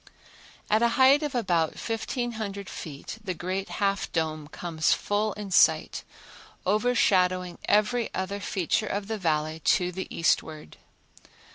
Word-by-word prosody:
At 215 +1 +2
a 235 - +5
height 270 +3 +6
of 295 -3 -3
about 170 -9 +1
1500 225 -4 -4
feet 155 +7 -8
the 185 -4 -3
great 185 +3 -3
Half 200 -1 -1
Dome 155 -2 -2
comes 160 0 0
full 205 +1 -1
in 205 -2 -7
sight, - - +3 0.6
overshadowing 185 -4 +2
every 225 +3 +2
other 195 +2 -3
feature 200 +2 -1
of 200 0 -3
the 220 -1 -3
Valley 155 -2 0
to 180 +3 +2
the 190 +1 -5
eastward. 155 -2 -1
195 Hz, 130 wpm, -27 LUFS, 170-215 Hz, 0.6 s, height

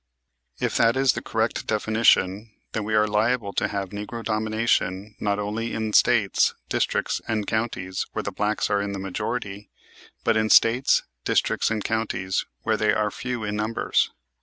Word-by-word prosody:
If - - 0
that 115 +2 +3
is 135 -2 +4
the - - -4
correct 110 0 -2
definition 110 -1 +2 0.2
then 110 - -2
we 110 0 0
are 105 0 +4
liable 105 0 0
to - - +1
have 100 -2 -3
"Negro 105 +3 -6
Domination" 110 -2 0
not 100 -1 0
only 105 +3 -3
in 110 -1 -2
States, - - +3
districts, - - 0
and 110 -2 -1
counties 105 -5 -2
where - - -2
the - - -3
blacks 105 +1 -1
are 100 0 +2
in 100 0 -3
the - - -4
majority, 100 +2 -4 0.5
but - - +2
in 110 0 +1
States, 120 +5 +5 0.2
districts - - +1
and 110 -2 -2
counties 105 -4 -1 0.2
where 110 -1 +1
they 105 -1 +2
are 105 -1 0
few 125 -1 -4
in 105 0 -2
numbers. 110 +2 0
110 Hz, 165 wpm, -24 LUFS, 105-115 Hz, 0.5 s, States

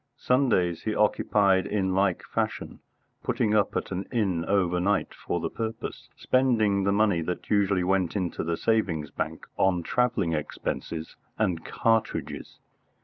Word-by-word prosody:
Sundays 120 -10 +2
he 110 - -2
occupied 100 -2 +3
in 95 -3 0
like 95 -1 +1
fashion, - - -3 0.4
putting 105 - 0
up 105 -2 +2
at - - -4
an 95 +1 -3
inn 95 -9 0
overnight 95 0 +1
for - - -3
the - - -3
purpose, 110 0 -5
spending 110 -7 +2
the 100 - +3
money 100 -4 +2
that 90 +2 -5
usually 100 -3 +3
went 95 -1 +1
into 90 -4 -2
the 85 0 -1
savings 90 -10 0
bank - - -4
on 90 -3 +2
travelling 120 -6 +1
expenses 80 +1 -4 0.2
and 90 -6 0
cartridges. 115 -1 -1
100 Hz, 140 wpm, -27 LUFS, 90-110 Hz, 0.4 s, occupied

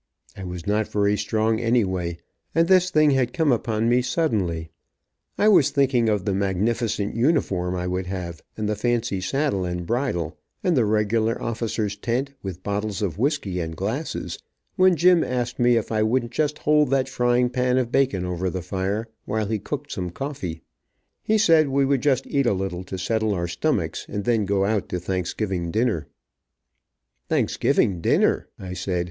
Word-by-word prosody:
I 95 - -8
was 90 -2 -6
not 105 +1 +1
very 105 0 +1
strong 110 +2 0
anyway, 95 -8 0 0.4
and 165 0 +4
this 185 -1 +5
thing 155 -4 +4
had 130 -3 +1
come 160 -4 +2
upon 115 -2 0
me 120 +1 +4
suddenly 105 - -1 0.7
I 210 - +3
was 170 -9 +6
thinking 130 -5 +2
of 105 -2 0
the 100 - 0
magnificent 100 +3 -1
uniform 95 - +1
I 90 0 -2
would 90 0 -2
have, 90 -3 -5 0.2
and 110 -1 -2
the 105 - 0
fancy 115 -3 -1
saddle 100 0 0
and 90 -1 -3
bridle, 110 - -2 0.2
and 180 -3 +2
the 120 -5 +3
regular 110 +2 +1
officer's 110 -3 -2
tent, 130 +6 -2
with 95 -2 -7
bottles 105 0 -2
of 95 0 -2
whiskey 125 - 0
and 80 -1 -4
glasses, 110 - -3 0.4
when 185 -2 +5
Jim 175 +2 +5
asked 125 -1 -2
me 120 -1 +4
if 115 - -2
I 110 -1 +1
wouldn't 120 +2 +1
just 150 +3 0
hold 150 -1 +3
that 135 -1 +2
frying 125 -1 +1
pan 125 0 +1
of 125 -2 0
bacon 125 -11 +1
over 90 +1 -2
the 90 0 -4
fire, 95 +5 -2 0.2
while 110 0 -1
he 110 +1 -1
cooked 145 +7 -5
some 90 -3 -3
coffee. 90 - -5 0.6
He 220 - +2
said 165 -7 +5
we 135 0 +2
would 135 -2 +1
just 135 -1 +2
eat 140 -3 0
a 120 - +3
little 95 -1 -3
to 95 - -5
settle 110 +2 0
our 85 -1 -2
stomachs, - - -1
and 105 - -3
then 115 -2 +1
go 100 0 +1
out 105 -1 -1
to 90 - -2
Thanksgiving 90 0 -2
dinner. 110 -4 0 1.2
"Thanksgiving 90 -4 +1
dinner," - - +2
I 90 -1 -7
said. 90 0 -2
110 Hz, 175 wpm, -24 LUFS, 95-130 Hz, 1.2 s, was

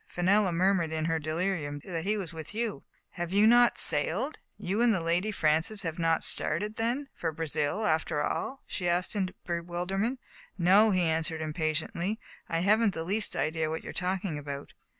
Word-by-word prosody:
Fenella 190 +2 +2
murmured 175 -1 +2
in 160 -1 -1
her 165 0 +1
delirium 155 -2 -2
that 170 -3 -4
he 210 +2 +1
was 180 -4 -5
with 160 +5 -8
you/' 225 -2 -2 0.2
" - - -51
Have 175 0 -3
you 205 +2 +5
not 240 +1 +6
sailed? 195 - +2 0.2
You 200 +5 -1
and 240 -1 +5
Lady 175 +6 +1
Francis 160 +4 +1
have 165 -1 -4
not 165 -1 +2
started, 210 +8 0
then, 245 +5 -1
for 165 - -2
Brazil, 160 +5 -2
after 155 -2 +1
all? 270 - -3
*' - - -42
she 175 -2 -2
asked 175 +4 0
in 190 -3 0 0.2
bewilderment. 180 +8 -2 0.2
" - - -28
No,'* 215 +3 +7
he 185 -3 +2
answered 160 0 0
impatiently. 160 +6 -2 0.2
" - - -25
I 165 0 0
haven't 210 +2 +3
the 160 - -3
least 205 +5 0
idea 155 0 0
what 160 +1 -4
you - - -6
are - - -13
talking 185 -3 -2
about. 140 -1 -7
175 Hz, 190 wpm, -29 LUFS, 160-205 Hz, 0.2 s, No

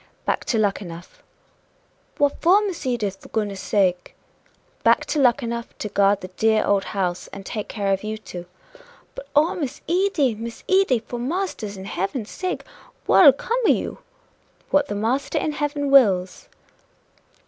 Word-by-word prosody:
"Back - - -1
to 230 - 0
Luckenough." 195 -5 -3 1.0
"What 285 -1 +1
for, 390 +5 +5
Miss 350 -8 -4
Edith, 215 -6 -1
for - - -15
goodness 205 -3 -2
sake?" 180 -3 0 0.7
"Back - - +3
to 305 - -1
Luckenough 235 -3 0
to 210 - -4
guard 200 0 +2
the 185 - -7
dear 220 +4 +2
old 200 -1 +2
house, 180 -3 -2
and 195 -1 -10
take 210 0 -4
care 200 -2 -1
of 195 - -2
you 215 +1 -3
two." 180 -5 -9 0.7
"But - - -9
oh, 310 +4 +4
Miss 285 -5 -4
Edy! 350 - +2
Miss 230 +2 -8
Edy! 380 -9 +4
for 235 +2 -7
Marster 295 - -2
in 195 -1 -8
heaven's 200 +4 -3
sake 370 0 -3 0.4
what'll 300 -7 +8
come 460 - -2
o' - - +4
you?" - - 0 0.7
"What 290 0 +3
the 205 - -4
Master 245 +9 -1
in 305 - 0
heaven 290 -1 -2
wills!" 190 -9 +3
230 Hz, 160 wpm, -23 LUFS, 200-290 Hz, 1.0 s, what'll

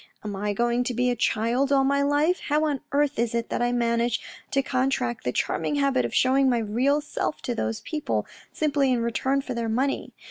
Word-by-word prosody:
Am 210 -1 -4
I 205 +2 -2
going 240 +3 +1
to 245 - -2
be 250 +1 +2
a - - -1
child 235 +5 +1
all 275 -1 +4
my 280 +1 +2
life? 290 +5 +2
How 300 +1 +2
on 290 -3 -1
earth 285 -3 +1
is 235 0 0
it 235 0 -2
that - - -2
I 240 0 +2
manage 235 0 +1 0.3
to 275 -1 +1
con 255 0 +1
tract 250 -3 -2
the - - 0
charming - - -1
habit 275 -2 +2
of - - -4
showing 265 +1 +4
my 245 - +2
real 245 +7 +1
self 295 0 -3
to 245 - -1
those 110 - -2
people 305 -2 -2 0.3
simply 285 -3 +1
in 240 -2 +1
return 265 +4 0
for 260 - -4
their 230 -1 -2
money 265 +5 -1
255 Hz, 220 wpm, -25 LUFS, 235-280 Hz, 0.3 s, all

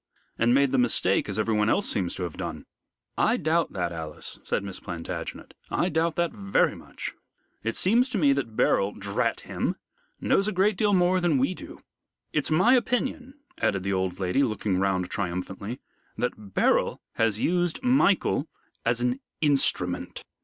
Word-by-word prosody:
And 115 +1 +2
made 140 -1 +4
the 135 - +2
mistake, 115 -5 +2
as 100 - -3
everyone 110 -1 +2
else 205 - +2
seems 90 -4 -1
to 90 - -4
have 85 -3 -4
done." - - -5 0.5
"I - - +3
doubt 165 +2 +1
that, 90 -3 -1
Alice," 80 -2 -5
said - - -1
Miss 100 -2 -6
Plantagenet, 85 -3 -6 0.2
"I 180 - +1
doubt 165 0 +1
that 170 -1 +1
very 100 -1 +1
much. - - -7 0.5
It 115 +1 -2
seems 235 +7 +3
to 245 - -2
me 145 -6 +4
that 125 -6 -3
Beryl 100 -1 +2
drat 100 0 -1
him! - - -2 0.4
knows 195 - +2
a - - +1
great 195 +3 +3
deal 205 +2 +2
more 180 0 +3
than 170 -5 +2
we 135 +8 +1
do. - - -11 0.5
It's - - 0
my 185 +11 +5
opinion," 255 +2 0 0.2
added 95 -2 +1
the 100 0 -1
old 95 -1 -1
lady, 95 +8 +1
looking 110 -6 0
round 95 -2 0
triumphantly, 95 +5 -4 0.4
"that 105 -5 -4
Beryl - - +2 0.2
has 110 -2 +2
used 175 +2 +1
Michael 225 - +3 0.4
as 115 +1 +1
an 125 +2 0 0.2
instrument." 135 - +1
120 Hz, 165 wpm, -26 LUFS, -, 0.5 s, my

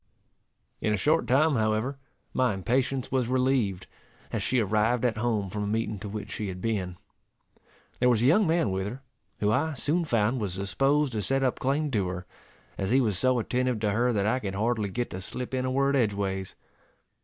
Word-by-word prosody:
In 105 - +1
a - - -2
short 155 - +2
time, 150 +5 +4
however, 110 +5 0 0.3
my 125 -5 +2
impatience 130 +6 0
was 130 -3 +1
relieved, 125 -7 +1 0.5
as - - -2
she 130 - +1
arrived 110 +3 +1
at 115 -3 +1
home 110 -3 0
from 105 - -3
a - - -2
meeting 110 -1 -1
to 105 +1 -6
which 105 0 -6
she 105 - -3
had 90 -1 -5
been. 95 -4 -2 1.0
There 125 - +4
was 120 -2 +3
a - - +4
young 180 +8 +5
man 165 - +2
with 95 +1 -2
her, 125 +6 -7 0.4
who 105 0 +3
I 145 +6 +1
soon 160 +7 0
found 115 -2 +1
was 95 -4 -2
disposed 135 - +1
to 110 -3 -2
set 135 +7 +1
up 130 - 0
claim 145 +3 0
to 100 -6 +1
her, 90 0 -5 0.5
as 95 - -1
he 130 +4 +4
was 105 -8 +1
so 130 -1 +3
attentive 125 0 0
to 105 -2 +1
her 120 +4 +2
that 100 -4 0
I 120 +5 +2
could 100 -5 -4
hardly 110 0 0
get 120 +5 -3
to 95 - -5
slip 125 +6 -5
in 130 0 0
a 130 - -1
word 140 +1 +2
edgeways. 100 -5 -1
115 Hz, 205 wpm, -27 LUFS, 105-130 Hz, 1.0 s, young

